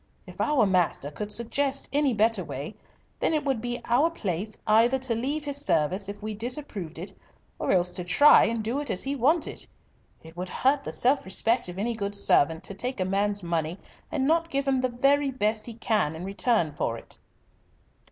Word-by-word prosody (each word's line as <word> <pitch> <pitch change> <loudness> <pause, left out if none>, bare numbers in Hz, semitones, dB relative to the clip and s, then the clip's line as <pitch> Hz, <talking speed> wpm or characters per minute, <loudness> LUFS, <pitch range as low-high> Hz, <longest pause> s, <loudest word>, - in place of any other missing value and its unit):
If - - -7
our 295 -7 +3
master 180 -6 +1
could 210 +7 -6
suggest 270 +5 0
any 285 -1 +3
better 225 +1 +2
way, - - -6 0.5
then 320 - +1
it 300 -2 -1
would 265 -5 0
be 240 0 -3
our 265 +8 +3
place 205 - -4
either 230 +4 +4
to 260 -2 -1
leave 280 +6 -2
his 285 0 -3
service 185 - +1
if 205 - -7
we 215 0 -3
disapproved 220 - -5
it, 180 +5 -6 0.5
or - - 0
else 180 -1 +2
to 180 - -4
try 285 +12 +6
and 230 -1 -1
do 235 +6 -1
it 290 - -3
as 185 - 0
he 275 +1 -2
wanted. 300 +6 0 0.6
It 160 +1 -13
would 180 +1 -5
hurt 275 +6 +1
the - - -5
self 270 +3 +2
respect 225 +3 0
of 180 - -8
any 230 +4 -1
good 205 -2 -4
servant 160 -5 +2
to - - -5
take 250 +4 -4
a 185 - +1
man's 200 +1 0
money 170 0 -2 0.3
and 265 -3 0
not 330 +3 +2
give 275 -1 -1
him 265 -1 +2
the 255 - 0
very 275 +3 +2
best 215 -3 -1
he 235 - -6
can 210 -9 0
in 170 +3 -6
return 195 -4 +1
for 115 -5 -2
it." - - -12
225 Hz, 200 wpm, -26 LUFS, 190-270 Hz, 0.6 s, try